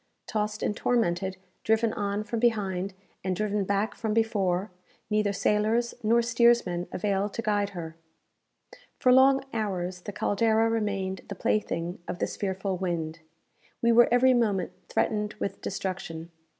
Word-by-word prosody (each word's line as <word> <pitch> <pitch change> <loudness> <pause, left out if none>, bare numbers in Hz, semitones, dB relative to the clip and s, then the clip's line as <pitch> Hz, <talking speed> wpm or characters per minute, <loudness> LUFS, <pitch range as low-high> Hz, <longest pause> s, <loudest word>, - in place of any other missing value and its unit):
Tossed 210 -1 -2
and 210 - 0
tormented, 190 -6 0 0.3
driven 220 0 +2
on 205 0 -2
from 225 +2 -3
behind, 195 -5 0 0.3
and 185 -1 -1
driven 210 +1 0
back 200 +2 0
from 220 -1 -2
before, 200 -4 +1 0.4
neither 210 -1 +2
sailors 215 +4 +1
nor 235 +1 +3
steersmen 235 -7 +3
avail 200 +1 0
to 230 - -4
guide 205 -1 +1
her. 160 -1 -6 1.0
For 255 - +4
long 265 +1 +6
hours 185 -5 -2
the 205 - -6
"Caldera" 225 +3 +2
remained 195 -4 -1
the 200 - -4
plaything 175 -3 -1
of - - -4
this - - -2
fearful 190 -1 -2
wind. 165 -3 -2 0.6
We 235 - +5
were 235 +1 +6
every 255 +1 +5
moment 210 -7 +1 0.2
threatened 210 -1 0
with 200 - -4
destruction. 175 -4 -4
205 Hz, 140 wpm, -27 LUFS, 190-225 Hz, 1.0 s, long